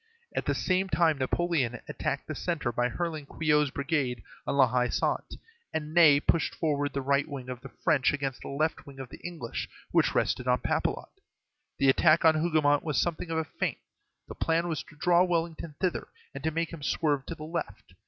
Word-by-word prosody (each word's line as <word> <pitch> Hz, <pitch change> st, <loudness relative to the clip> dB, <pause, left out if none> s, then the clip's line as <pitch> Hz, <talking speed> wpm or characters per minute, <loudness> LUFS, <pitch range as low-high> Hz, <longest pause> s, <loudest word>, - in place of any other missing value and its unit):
At -, -, -1 dB
the -, -, +2 dB
same 190 Hz, +1 st, +1 dB
time 160 Hz, -5 st, +3 dB
Napoleon 135 Hz, -3 st, 0 dB
attacked -, -, -3 dB
the -, -, -4 dB
centre 155 Hz, -8 st, -2 dB
by 120 Hz, +1 st, 0 dB
hurling 155 Hz, +1 st, -3 dB
Quiot's 150 Hz, -2 st, +2 dB
brigade 135 Hz, -, -1 dB, 0.2 s
on -, -, 0 dB
La 135 Hz, -, +7 dB
Haie 125 Hz, +1 st, +1 dB
Sainte, -, -, -1 dB, 0.4 s
and 155 Hz, 0 st, -3 dB
Ney 160 Hz, -5 st, +7 dB
pushed 165 Hz, +2 st, +1 dB
forward 145 Hz, -3 st, 0 dB
the 140 Hz, -, -2 dB
right 140 Hz, +1 st, +2 dB
wing 135 Hz, -4 st, -7 dB
of 125 Hz, -1 st, -6 dB
the 135 Hz, -, -9 dB
French 150 Hz, -6 st, +2 dB
against 140 Hz, -3 st, -3 dB
the -, -, -8 dB
left 155 Hz, +3 st, -1 dB
wing 140 Hz, -1 st, -11 dB
of 130 Hz, -2 st, -7 dB
the -, -, -11 dB
English, 165 Hz, -10 st, -5 dB, 0.2 s
which -, -, +3 dB
rested 125 Hz, -, 0 dB
on 125 Hz, 0 st, +2 dB
Papelotte. -, -, -2 dB, 0.6 s
The 135 Hz, -, +4 dB
attack 160 Hz, +4 st, +5 dB
on 160 Hz, -, +7 dB
Hougomont 155 Hz, -3 st, +2 dB
was 150 Hz, -5 st, 0 dB
something 175 Hz, 0 st, -1 dB
of 165 Hz, -, -1 dB
a 160 Hz, -, +1 dB
feint; -, -, -3 dB, 0.5 s
the -, -, -7 dB
plan 165 Hz, +1 st, 0 dB
was 160 Hz, -2 st, -2 dB
to 155 Hz, -, -16 dB
draw 175 Hz, +3 st, +4 dB
Wellington 165 Hz, -3 st, -2 dB
thither, 185 Hz, -2 st, -1 dB, 0.3 s
and -, -, -7 dB
to -, -, +3 dB
make 165 Hz, +1 st, -2 dB
him 165 Hz, -, -8 dB
swerve 145 Hz, -1 st, 0 dB
to 165 Hz, -, -4 dB
the 155 Hz, -, -9 dB
left. 155 Hz, -, -5 dB
150 Hz, 200 wpm, -29 LUFS, 135-165 Hz, 0.6 s, La